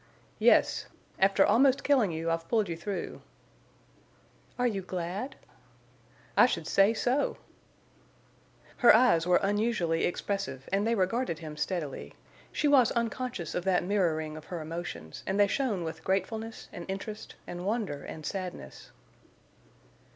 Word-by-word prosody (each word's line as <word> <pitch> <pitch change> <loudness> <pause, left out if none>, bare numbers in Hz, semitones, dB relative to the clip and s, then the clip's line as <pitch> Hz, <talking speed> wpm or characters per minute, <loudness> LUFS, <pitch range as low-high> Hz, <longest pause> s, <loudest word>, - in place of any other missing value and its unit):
"Yes. - - +4 0.3
After 195 0 +5
almost 265 +2 +4
killing 260 -8 +3
you 165 +1 -2
I've 165 0 -2
pulled 220 -4 +2
you 165 - -2
through." 195 +4 -5 1.4
"Are 250 - +1
you 210 -5 0
glad?" 185 +8 -4 1.0
"I - - +7
should 170 -9 -2
say 195 +5 +4
so!" 255 +5 0 1.4
Her 240 - +7
eyes 220 -9 +4
were 180 - +5
unusually 200 -5 +1
expressive, 190 -7 -3
and 200 +2 +2
they 230 - +2
regarded 195 -1 0
him 155 -2 -8
steadily; 150 -3 -4 0.4
she 300 - 0
was 270 -5 +5
unconscious 235 -6 -2
of 180 - -2
that 185 -2 +2
mirroring 165 -5 0
of 155 - -10
her 175 - -5
emotions 160 - -6
and 195 +2 0
they 205 - +7
shone 210 -4 -1
with 160 0 -6
gratefulness 220 +5 -2
and 175 - -7
interest 210 +3 -6
and 175 0 -6
wonder 200 -8 -2
and 155 -1 -8
sadness. 180 - -6
190 Hz, 135 wpm, -29 LUFS, 165-225 Hz, 1.4 s, I